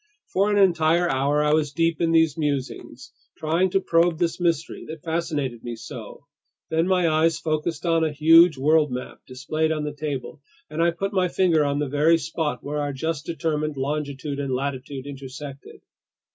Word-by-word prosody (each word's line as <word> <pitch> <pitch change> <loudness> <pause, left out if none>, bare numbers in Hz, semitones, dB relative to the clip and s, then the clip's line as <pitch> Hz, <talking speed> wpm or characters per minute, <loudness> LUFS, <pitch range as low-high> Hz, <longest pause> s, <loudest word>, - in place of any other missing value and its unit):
For 200 +2 +2
an 205 - +2
entire 175 -3 +3
hour 145 +1 +1
I 150 0 +2
was 155 -2 +1
deep 165 +2 0
in 165 -1 +2
these 160 -3 +3
musings, 145 -4 -4 0.2
trying 165 +4 +1
to 195 - +2
probe 170 -2 +2
this 170 0 -1
mystery 170 -3 -1
that 160 -1 -8
fascinated 155 -7 -2
me 120 -1 -5
so. 115 +4 -10 0.5
Then 165 +2 +1
my 180 -2 +2
eyes 160 +1 +2
focused 160 0 -2
on 165 -1 +2
a 160 - 0
huge 160 +2 +6
world 150 +1 +3
map 125 0 -6
displayed 155 +5 -2
on 155 -1 -1
the 150 0 -4
table, 145 -3 -5 0.3
and 160 - -2
I 170 - +4
put 195 +4 -3
my 185 -2 +2
finger 170 -4 +2
on 140 0 0
the 145 0 -1
very 150 +4 +3
spot 160 -6 -3
where 150 +1 -3
our 145 -1 -2
just 155 +2 -3
determined 155 -3 -2
longitude 140 0 -3
and 135 -2 -1
latitude 135 0 -4
intersected. 140 0 -9
155 Hz, 180 wpm, -24 LUFS, 140-165 Hz, 0.5 s, huge